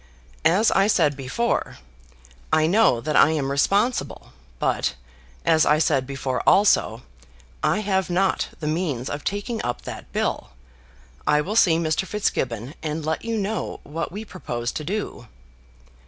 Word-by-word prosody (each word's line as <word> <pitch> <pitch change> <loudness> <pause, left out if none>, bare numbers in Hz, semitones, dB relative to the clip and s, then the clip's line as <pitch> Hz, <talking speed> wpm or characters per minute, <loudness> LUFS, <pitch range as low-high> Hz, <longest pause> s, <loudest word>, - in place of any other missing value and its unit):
"As 200 +7 +3
I 195 +1 +3
said 155 -8 +3
before, 140 - -2 0.7
I 155 - +4
know 175 - +3
that 150 +2 -2
I - - +7
am 140 -3 -1
responsible; 200 - 0 0.2
but, - - 0 0.5
as 160 -1 +4
I 150 - +4
said 135 -4 +1
before 135 -2 -2
also, 160 - +3 0.6
I 215 - +1
have 190 -2 0
not 190 +2 +1
the 155 - -5
means 150 -6 -2
of 145 0 -5
taking 205 +3 -3
up 120 - -3
that - - -8
bill. - - -2 0.7
I 150 - +4
will 200 +8 -4
see 170 -7 +5
Mr. 165 +3 0
Fitzgibbon, 130 - -2
and 155 0 -3
let 160 0 -2
you 230 0 -2
know 210 +2 -3
what 165 +3 -4
we 210 +4 -6
propose 120 - -4
to 155 - -5
do." 185 - -4
160 Hz, 150 wpm, -23 LUFS, 140-200 Hz, 0.7 s, I